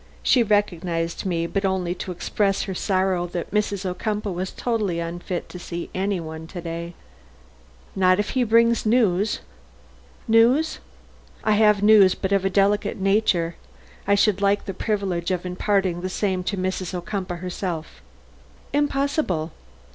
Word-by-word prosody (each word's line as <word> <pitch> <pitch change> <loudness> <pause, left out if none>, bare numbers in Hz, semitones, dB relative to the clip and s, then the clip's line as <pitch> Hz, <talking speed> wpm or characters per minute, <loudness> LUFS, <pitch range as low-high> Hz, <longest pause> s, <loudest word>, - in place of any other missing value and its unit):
She 255 - +4
recognized 180 -6 0
me, 170 -2 0
but 195 +4 -2
only 190 -2 0
to 180 +1 -6
express 195 +3 0
her 190 - -4
sorrow 185 -2 0
that 175 -1 -5
Mrs. 205 -2 -1
Ocumpaugh 205 +3 -2
was 185 +2 -3
totally 215 -8 -1
unfit 175 +1 -4
to 180 - -8
see 170 -1 -6
any 195 0 -1
one 160 0 -7
to 180 - -7
day. 170 0 -6 1.0
"Not 185 -1 +4
if 205 - -1
he 255 - +1
brings 230 0 +3
news?" 215 -3 +2 0.9
"News?" 240 +8 +4 0.6
"I 215 - +2
have 210 -1 +4
news, 205 -3 +7
but 190 - -3
of 195 -1 +2
a 195 - +2
delicate 200 +1 +1
nature. 190 -4 +1 0.5
I 200 - +5
should 200 -1 +2
like 200 0 +2
the 195 - -4
privilege 190 -4 -2
of 185 -1 -2
imparting 185 -1 0
the 185 - -3
same 185 -1 -1
to 200 - -2
Mrs. 185 0 -2
Ocumpaugh 180 0 -4
herself." 175 - -5 0.7
"Impossible." 280 - 0
190 Hz, 145 wpm, -23 LUFS, 175-210 Hz, 1.0 s, news